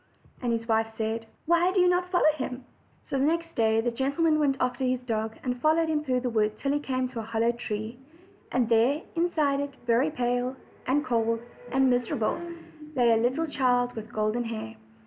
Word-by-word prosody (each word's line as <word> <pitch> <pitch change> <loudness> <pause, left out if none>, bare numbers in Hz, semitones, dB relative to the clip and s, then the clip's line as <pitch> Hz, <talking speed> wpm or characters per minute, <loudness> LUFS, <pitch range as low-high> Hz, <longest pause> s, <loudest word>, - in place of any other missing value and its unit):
And 245 -2 0
his 230 0 -2
wife 225 -1 +2
said: 225 +1 -2 0.2
"Why 340 +2 +3
do 380 - +1
you 360 - +5
not 360 0 +2
follow 350 -4 +4
him?" 255 -2 -5 0.4
So 275 - -2
the - - +2
next 330 +2 0
day 220 -1 +2
tne 240 +1 0
gentleman 280 +6 +1
went 280 -3 +2
after 250 +1 -1
his 255 -1 0
dog, 220 -2 -2
and 250 -1 -3
followed 320 +1 +3
him 305 -1 0
through 255 -3 0
the 250 - -1
wood 215 -1 +1
till 275 - -1
he 290 - +1
came 260 -3 -1
to 245 -2 -6
a - - -2
hollow 225 +1 +1
tree. 225 0 -5 0.5
And 250 -2 +2
there, 240 +7 +3
inside 310 -5 +1
it, 285 -1 -4
very 240 +5 +3
pale, 245 -2 -1 0.3
and 290 +4 +2
cold, 230 -1 +1 0.3
and 265 0 +3
miser 245 -1 0
able, 225 +9 -1 0.5
lay 240 -3 +4
a 225 - +5
little 255 +8 +1
child 245 -4 +1
with 220 0 -8
golden 215 +3 0
hair. 215 - -5
250 Hz, 205 wpm, -27 LUFS, 230-290 Hz, 0.5 s, you